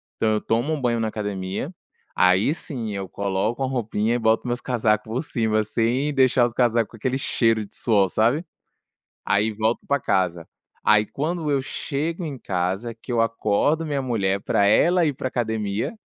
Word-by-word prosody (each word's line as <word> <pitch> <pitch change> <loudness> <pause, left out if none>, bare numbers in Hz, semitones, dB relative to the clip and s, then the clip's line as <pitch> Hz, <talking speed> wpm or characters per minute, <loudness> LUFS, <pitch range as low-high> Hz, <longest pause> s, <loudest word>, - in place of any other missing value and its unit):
Então, 110 - +1
eu 105 - 0
tomo 120 +8 0
um 145 - -3
banho 120 -2 +1
na 110 -1 0
academia, 100 - -4 0.4
aí 90 +8 +4
sim 125 -9 -5
eu 95 -1 -4
coloco 100 +5 -2
uma 130 - 0
roupinha 115 -2 0
e - - 0
boto 110 +2 +2
meus 120 +1 -2
casaco 110 -4 +1
por 115 +5 -2
cima, 110 -6 0
sem 120 +7 0
deixar 130 -2 +4
os 120 - -3
casaco 120 -3 +2
com 115 - -12
aquele 130 +4 -1
cheiro 115 -4 +1
de - - -10
suor, 100 -5 +2
sabe. 120 - +2 0.8
Aí 105 +2 +2
volto 110 +2 -1
pra 140 0 +2
casa 90 -6 0 0.4
e - - +2
aí, 105 0 +5
quando 155 +3 -2
eu 135 -1 +2
chego 160 +6 -3
em 140 -4 -5
casa, 95 +4 -2
que 120 +2 -9
eu 115 -1 +2
acordo 115 +8 +1
minha 145 -2 -1
mulher 100 -6 0
pra 100 - +2
ela 170 - +4
ir 145 - +1
pra 130 - -4
academia, 110 - -2
115 Hz, 185 wpm, -23 LUFS, 105-130 Hz, 0.8 s, aí